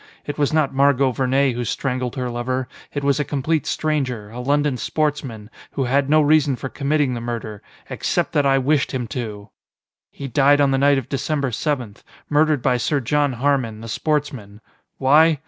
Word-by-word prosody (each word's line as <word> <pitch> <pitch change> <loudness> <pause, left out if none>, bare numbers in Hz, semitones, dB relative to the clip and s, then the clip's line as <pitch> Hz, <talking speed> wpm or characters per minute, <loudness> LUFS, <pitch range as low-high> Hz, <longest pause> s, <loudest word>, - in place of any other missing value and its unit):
It 145 - -5
was 145 - +2
not 155 -4 +1
Margot 135 -1 +3
Vernee 130 +1 +1
who 120 +1 -3
strangled 125 0 -2
her 125 -2 -3
lover: 125 +2 -2 0.2
it 145 - -4
was 140 +1 +2
a - - +2
complete 145 +2 -1
stranger, 130 -9 -2
a 120 - -8
London 145 +2 +1
sportsman, 130 -5 -3 0.2
who 135 - -1
had 135 +2 +1
no 155 +1 +5
reason 150 -2 +3
for 130 +2 -6
committing 140 -1 0
the 120 - -4
murder, 115 -3 -5 0.3
except - - -1
that 145 - +2
I 135 -1 +3
wished 140 +2 +1
him 125 -2 -2
to! 105 -3 -6 0.6
"He 140 - -8
died 140 +3 +4
on 140 -1 +3
the 135 - +1
night 140 0 +4
of 130 - -3
December 140 0 -2
seventh, 125 -4 -3 0.3
murdered 150 -3 +2
by 125 -2 +2
Sir 145 +4 0
John 145 +2 +1
Harmon, 125 -4 0
the 115 - -8
sportsman. 125 -6 -2 0.4
Why? 150 +4 +5
135 Hz, 180 wpm, -21 LUFS, 125-145 Hz, 0.6 s, no